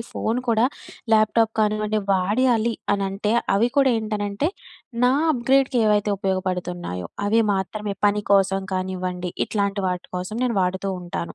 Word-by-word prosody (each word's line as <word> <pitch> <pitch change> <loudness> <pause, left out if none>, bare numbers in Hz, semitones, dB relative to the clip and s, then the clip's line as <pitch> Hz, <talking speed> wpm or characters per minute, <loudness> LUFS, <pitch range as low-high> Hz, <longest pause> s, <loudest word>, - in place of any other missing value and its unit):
ఈ - - -3
ఫోను 235 +3 -2
కూడా 230 0 +3 0.5
ల్యాప్టాప్ 220 +1 +3
కానివ్వండి 215 0 +1
వాడాలి 225 +4 +2 0.2
అనంటే 200 +1 -1 0.2
అవి 220 +5 +3
కూడా 275 -2 +5
ఏంటనంటే 210 +4 -2 0.6
నా 250 - +5 0.2
అప్గ్రేడ్‌కి 265 0 +2
ఏవైతే 210 0 +2
ఉపయోగపడుతున్నాయో 180 - -3 0.2
అవి 220 +3 +3
మాత్రమే. 200 +2 -3
పని 205 0 +1
కోసం 195 -1 +3
కానివ్వండి, 185 -1 -3 0.2
ఇట్లాంటి 200 -1 -1
వాటి 180 0 -4
కోసం 185 +4 -4
నేను 235 -4 -1
వాడుతూ 190 +2 -1
ఉంటాను. 175 -1 -5
205 Hz, 130 wpm, -23 LUFS, 190-225 Hz, 0.6 s, కూడా